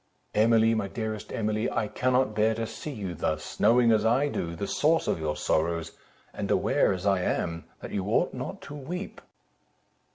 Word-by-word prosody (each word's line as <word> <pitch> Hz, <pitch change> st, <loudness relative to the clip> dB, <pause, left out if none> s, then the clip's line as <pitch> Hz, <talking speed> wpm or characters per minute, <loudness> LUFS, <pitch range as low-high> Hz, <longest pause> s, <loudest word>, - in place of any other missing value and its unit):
"Emily, 115 Hz, +1 st, +4 dB
my 110 Hz, -3 st, -1 dB
dearest 110 Hz, 0 st, -5 dB
Emily, 110 Hz, 0 st, -1 dB
I 110 Hz, -, -1 dB
cannot 125 Hz, 0 st, +1 dB
bear 110 Hz, +1 st, +2 dB
to 115 Hz, +1 st, -2 dB
see 115 Hz, -, -7 dB
you 100 Hz, -10 st, -5 dB
thus, 80 Hz, -1 st, -3 dB
knowing, 120 Hz, 0 st, +5 dB
as 110 Hz, -1 st, +3 dB
I 125 Hz, +6 st, +3 dB
do, 85 Hz, -10 st, -3 dB
the 100 Hz, -, -3 dB
source 160 Hz, +9 st, +2 dB
of -, -, 0 dB
your 75 Hz, -1 st, -1 dB
sorrows, 85 Hz, +1 st, 0 dB, 0.4 s
and -, -, -4 dB
aware, -, -, +3 dB
as 95 Hz, +1 st, -3 dB
I 95 Hz, -2 st, +3 dB
am, 85 Hz, -2 st, -2 dB, 0.2 s
that -, -, -7 dB
you 95 Hz, -2 st, -2 dB
ought 105 Hz, -, +2 dB
not -, -, -6 dB
to 140 Hz, -, -9 dB
weep." 170 Hz, +7 st, -6 dB
110 Hz, 185 wpm, -27 LUFS, 90-120 Hz, 0.4 s, knowing